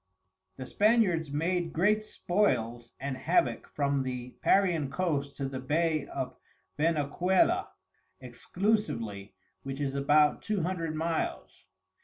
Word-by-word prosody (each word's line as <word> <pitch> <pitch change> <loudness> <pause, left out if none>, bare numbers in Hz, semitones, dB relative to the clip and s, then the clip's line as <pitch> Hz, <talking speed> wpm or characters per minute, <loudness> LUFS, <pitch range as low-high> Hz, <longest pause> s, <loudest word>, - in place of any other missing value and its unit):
The 130 - -6
Spaniards 205 - +2
made 165 +3 -1
great 210 +6 +2
Spoils 120 - -1
and 140 0 -3
Havock 130 -4 +1
from 140 -1 0
the 125 -1 -4
Parian 175 -8 +3
Coast 140 -3 -2
to 135 - -2
the 135 -1 -5
Bay 155 +3 0
of 130 -2 -4 0.4
Venecuola, 165 +4 +2 0.5
exclusively, 120 - -2 0.3
which 135 0 -6
is 140 -2 -1
about 150 +2 +3
Two 210 -5 -1
Hundred 165 -3 -2
Miles. 165 +1 -3
150 Hz, 115 wpm, -29 LUFS, 135-175 Hz, 0.5 s, Parian